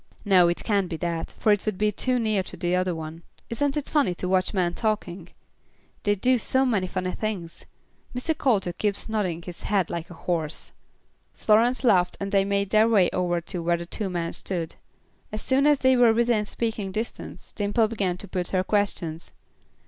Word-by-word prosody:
No, 185 -3 +6
it 175 - -1
can't 200 -4 +1
be 165 - -3
that, 170 -1 -3
for 215 - +3
it 205 -1 +2
would 210 -3 -1
be 210 +1 +2
too 250 +5 0
near 215 -4 +1
the 180 -1 -2
other 180 -1 0
one. 160 +1 -7 0.3
Isn't 280 +5 0
it 295 - -3
funny 275 - +1
to 180 - -4
watch 185 0 +2
men 180 -4 0
talking? 195 -5 -2 0.7
They 205 0 +2
do 250 +5 +2
so 260 +4 +2
many 205 -7 +1
funny 185 0 -2
things. 190 -7 -5 0.5
Mr. 320 +6 0
Coulter 205 -11 +1
keeps 205 +2 -2
nodding 190 -7 -2
his 175 -1 -7
head 195 -4 0
like 170 -1 -4
a 175 - -10
horse." 160 -3 -3 0.6
Florence 235 +5 +3
laughed 185 -7 +3
and 195 0 -4
they 195 -1 +4
made 200 0 -1
their 220 +1 +5
way 200 -6 +4
over 175 -1 0
to 175 +1 -5
where 170 +1 +1
the 170 - -6
two 195 +3 -4
men 170 -2 -3
stood. 170 -4 -3 0.6
As 215 0 -5
soon 270 +2 +3
as 295 -1 +5
they 260 0 +5
were 240 -2 +5
within 235 -3 +2
speaking 220 -4 -3
distance, 220 +4 -6
Dimple 210 +2 +1
began 195 -5 -1
to 200 - -8
put 180 -1 -3
her 185 -1 0
questions. 185 -5 -1
195 Hz, 195 wpm, -25 LUFS, 175-220 Hz, 0.7 s, No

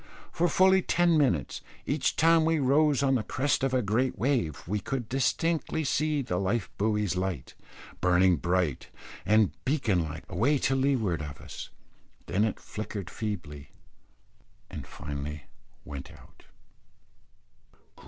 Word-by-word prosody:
For 175 - +1
fully 190 0 +5
ten 175 -1 +2
minutes, 125 - +1 0.2
each 145 0 0
time 165 0 +5
we 165 0 +2
rose 140 +1 +3
on 135 -1 +3
the 125 - +2
crest 130 +5 0
of 135 - +2
a 130 -1 +1
great 120 +6 0
wave, 115 - -1
we 105 +3 -1
could 125 0 -4
distinctly 160 +5 0
see 150 0 0
the 90 -7 -2
life 100 +3 -1
buoy's 105 -2 +1
light, 90 -7 -3 0.5
burning 90 0 +4
bright 90 -6 0 0.4
and 110 -1 +4
beacon 115 - +1
like, 80 +1 -6
away 115 +10 +2
to 135 0 +1
leeward 125 - +1
of 75 -2 -7
us; - - -8 0.6
then 100 +4 +1
it 110 - -3
flickered 105 -3 -6
feebly, 80 -10 -5 1.0
and - - -7
finally 75 0 -6 0.4
went 70 -2 -8
out. - - -18
110 Hz, 135 wpm, -28 LUFS, 90-140 Hz, 1.0 s, fully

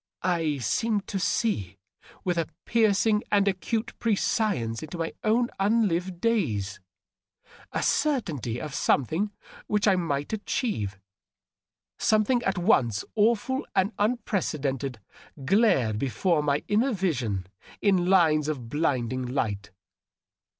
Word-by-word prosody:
•. - - 0
I 165 -5 +1
seemed 200 - 0
to 195 - -2
see 100 - -1 0.5
with 180 -1 0
a 165 - -1 0.2
piercing 215 -1 +3
and 200 -1 +3
acute 220 +5 -1
prescience 200 - 0
into 155 +3 -7
my 165 -1 -3
own 235 +3 +2
unlived 195 -4 +1
days. 120 - 0 0.9
A - - -1
certainty 160 - 0
of 150 -2 -6
something 160 - +1 0.4
which 210 0 +1
I 195 - +5
might 145 -2 -2
adhieve 205 - -2 0.6
— - - -60
something 220 +3 +3
at 195 -5 -1
once 120 - +2
awful 235 +5 +2
and 195 +3 +2
un 220 +4 +2
precedented 140 - -2 0.3
— 140 - -14
glared 135 - +3
before 150 - +1
my 145 0 0
inner 235 +6 +2
vision 125 - -1 0.3
in 185 -3 +2
lines 160 -5 +4
of 130 -7 -4
blinding 130 -4 0
light. 105 -6 -2
180 Hz, 125 wpm, -27 LUFS, 135-215 Hz, 0.9 s, I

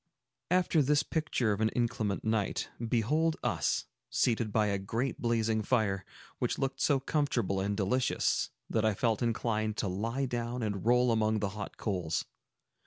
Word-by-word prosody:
After 180 -3 +3
this 145 +2 +3
picture 155 -9 0
of 105 +1 -1
an 110 - +3
inclement 115 -4 0
night, 110 -2 0 0.2
behold 150 +9 +2
us - - 0 0.2
seated 115 -3 +1
by 110 0 +3
a 100 -1 0
great 115 +6 -2
blazing 115 -2 +1
fire, 100 -4 +1 0.3
which - - 0
looked 135 0 -2
so 140 -3 +3
comfortable 130 -9 0
and 100 +1 -1
delicious 110 +6 +1 0.2
that 110 - 0
I 110 -2 +2
felt 115 +2 +1
inclined 110 -2 0
to 105 - 0
lie 115 +9 -1
down 120 -1 -3
and 100 -3 -2
roll 125 0 +4
among 110 -1 +2
the 105 -1 -1
hot 100 0 -7
coals. 90 -7 -1
115 Hz, 160 wpm, -31 LUFS, 105-125 Hz, 0.3 s, roll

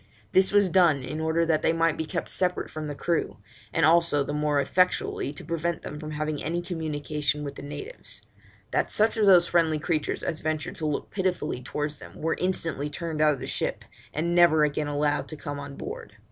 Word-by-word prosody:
This 190 0 +4
was 200 -3 +4
done 165 -7 +4
in 150 +5 -4
order 160 +1 +1
that 160 -2 +2
they - - +2
might 165 -1 +2
be 160 - -3
kept 170 +1 -3
separate 180 -1 0
from 155 -1 -5
the 145 - -5
crew, 170 +3 -1 0.3
and - - +3
also 165 -3 +4
the 145 - -4
more 150 -1 +1
effectually 180 -2 +1
to 145 - -10
prevent 170 +1 -2
them 150 - -6
from 155 0 -6
having 155 -1 -3
any 170 +3 -1
communication 150 -3 -2
with 140 - -5
the - - -9
natives; 405 - -8 0.5
that - - +1
such 215 +1 +2
of 215 -2 +2
those 180 -3 +7
friendly 165 -3 +2
creatures 155 0 -1
as 160 -2 -2
ventured 155 -1 -3
to 155 - -2
look 150 - -3
pitifully 180 -9 -1
towards 145 +3 -3
them - - -12
were 165 +1 0
instantly 165 -5 -1
turned 160 0 -4
out 150 -1 +5
of - - -12
the - - -5
ship, - - -3 0.3
and 170 +3 -1
never 170 -3 +6
again 150 0 0
allowed 145 0 0
to 155 - -6
come 145 0 -5
on 140 0 -7
board. 460 +4 -7
155 Hz, 210 wpm, -26 LUFS, 150-170 Hz, 0.5 s, those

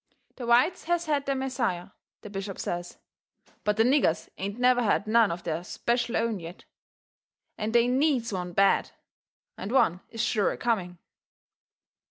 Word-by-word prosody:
The 245 - -6
whites 250 +10 +3
has 345 0 0
had 290 -3 0
their 275 - +1
Messiah, 250 -10 -2 0.3
the 210 - -9
bishop 195 -1 -5
says, 175 0 -4 0.7
but 210 0 +1
the 225 - +5
niggers 240 - +2
ain't 200 +3 -4
never 250 0 +4
had 210 -2 +1
none 225 0 +4
of 170 +1 -5
their 165 0 -3
SPECIAL 235 +5 -1
OWN 230 -3 0
yet. 170 +2 -10 0.9
And 215 0 -3
they 235 +1 +4
needs 255 -3 +1
one 180 -1 -3
bad, 195 +2 +3 0.7
and 195 +4 -5
one 180 -9 +3
is 225 - -10
sure 210 -5 +1
a - - -5
coming. 190 -7 -1
225 Hz, 160 wpm, -27 LUFS, 190-250 Hz, 0.9 s, the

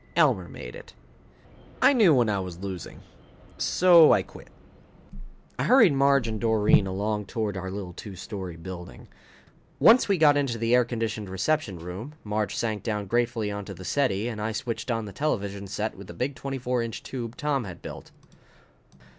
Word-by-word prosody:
Elmer - - +3
made - - -9
it." - - -13 0.8
I 285 - +6
knew 215 -10 +5
when 120 -3 +3
I 100 -2 0
was 90 -2 -6
losing, 95 -2 -7 0.6
so 170 -3 +6
I - - +4
quit. - - -14 1.1
I - - 0
hurried 250 - +6
Marge 140 -2 +3
and 110 -2 -4
Doreen 110 -3 +3
along 105 +2 -2
toward 110 -3 -2
our 95 0 -4
little 95 -2 -6
two 100 +2 -9
story 95 -2 -7
building. 90 +1 -9 0.7
Once 230 -1 +6
we 195 - +3
got 150 -3 +5
into 135 -5 0
the 115 +1 0
air 125 -1 +5
conditioned 110 -4 -3
reception 100 - -1
room, 95 - -8
Marge 105 0 -2
sank 110 -3 -2
down 105 -3 -3
gratefully 115 0 0
onto 100 -1 -6
the 95 - -10
settee 120 -6 0
and 110 -3 -5
I 110 +1 -2
switched 115 +3 -4
on 115 -2 -1
the 100 - -9
television 100 -9 -2
set 105 +3 -3
with 100 0 -11
the 85 - -10
big 130 +9 -2
24 125 -3 -3
inch 115 -2 -5
tube 120 -3 -6
Tom 145 -6 -1
had 90 -3 -10
built. - - -9
110 Hz, 175 wpm, -26 LUFS, 100-130 Hz, 1.1 s, I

